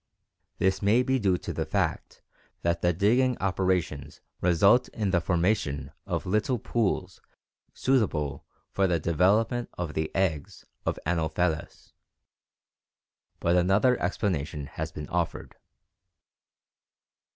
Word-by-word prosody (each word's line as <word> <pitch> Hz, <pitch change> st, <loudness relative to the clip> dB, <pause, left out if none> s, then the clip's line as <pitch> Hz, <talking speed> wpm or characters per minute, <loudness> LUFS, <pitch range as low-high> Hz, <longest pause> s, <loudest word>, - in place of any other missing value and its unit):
This 95 Hz, 0 st, +1 dB
may 110 Hz, +5 st, +4 dB
be 130 Hz, 0 st, +1 dB
due 95 Hz, -5 st, +2 dB
to -, -, -6 dB
the -, -, -1 dB
fact -, -, -2 dB, 0.4 s
that 85 Hz, 0 st, 0 dB
the 90 Hz, -, +3 dB
digging 120 Hz, +8 st, +2 dB
operations 90 Hz, -6 st, -1 dB, 0.2 s
result 90 Hz, +7 st, +4 dB
in 105 Hz, -4 st, -2 dB
the 90 Hz, -2 st, +2 dB
formation 85 Hz, -6 st, 0 dB, 0.2 s
of 85 Hz, -2 st, -2 dB
little 110 Hz, +6 st, +1 dB
pools 100 Hz, -5 st, -2 dB, 0.5 s
suitable 85 Hz, -, 0 dB, 0.3 s
for 100 Hz, -1 st, +2 dB
the 85 Hz, -2 st, +1 dB
development 105 Hz, -, +2 dB
of 85 Hz, -3 st, -3 dB
the 80 Hz, 0 st, -1 dB
eggs 80 Hz, -7 st, -1 dB, 0.2 s
of -, -, 0 dB
Anopheles, 80 Hz, 0 st, -2 dB, 1.5 s
but 85 Hz, +1 st, +2 dB
another 95 Hz, +8 st, +4 dB
explanation 80 Hz, -6 st, -2 dB
has 80 Hz, +3 st, -5 dB
been 75 Hz, -1 st, -7 dB
offered. 85 Hz, -1 st, -3 dB
90 Hz, 115 wpm, -27 LUFS, 80-105 Hz, 1.5 s, may